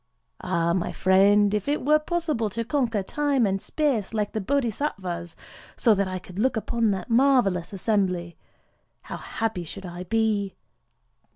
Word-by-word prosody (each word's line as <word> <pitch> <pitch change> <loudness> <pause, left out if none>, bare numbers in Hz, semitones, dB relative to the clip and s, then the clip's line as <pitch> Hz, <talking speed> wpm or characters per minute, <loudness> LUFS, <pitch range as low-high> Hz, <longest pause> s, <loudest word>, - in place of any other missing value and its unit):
Ah, 170 0 0
my 175 -1 -1
friend! 200 +2 +4
if 210 +2 -1
it 290 -2 -1
were 305 +1 +5
possible 305 -8 -1
to 230 +3 -4
conquer 235 -5 0
Time 285 +1 +1
and 195 -1 -1
Space, 250 -9 -1
like 210 -1 -1
the 220 - -2
Bodhisattvas, 195 - -2 0.4
so 225 - +4
that 200 -1 0
I 185 0 -3
could 185 +1 -9
look 255 +1 +1
upon 230 0 0
that 195 +1 -3
marvellous 235 -8 +3
assembly, 185 -4 -1 0.7
how - - -6
happy 220 -6 -3
should 190 +4 -9
I 175 +1 -7
be!" 210 -1 0
210 Hz, 155 wpm, -25 LUFS, 190-245 Hz, 0.7 s, were